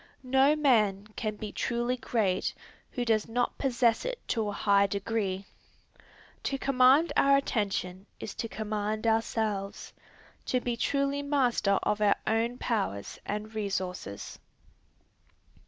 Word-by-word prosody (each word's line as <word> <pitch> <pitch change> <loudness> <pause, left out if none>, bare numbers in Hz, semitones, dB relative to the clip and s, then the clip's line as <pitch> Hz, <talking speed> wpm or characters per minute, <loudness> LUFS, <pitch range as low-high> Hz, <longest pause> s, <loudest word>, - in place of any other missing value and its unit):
No 265 +3 +4
man 215 -9 +3
can 215 -2 -2
be 210 0 -6
truly 240 +1 -1
great 220 -6 0 0.3
who 245 -2 -3
does 220 -2 +2
not 245 +2 -1
possess 240 -4 +2
it - - -3
to 220 -3 0
a - - -2
high 200 0 +3
degree. 200 -1 -2 1.0
To 275 - -2
command 270 +4 +4
our 275 0 +5
attention 200 -7 -2
is 205 - -6
to 230 - -4
command 215 0 -3
ourselves, 220 -3 -1 0.5
to 255 - +2
be 245 -1 -2
truly 280 +3 0
master 255 -8 +2
of 210 0 0
our 205 -1 +5
own 230 +2 0
powers 200 - -2
and 210 +2 -4
resources. 185 - -4
225 Hz, 125 wpm, -29 LUFS, 205-250 Hz, 1.0 s, our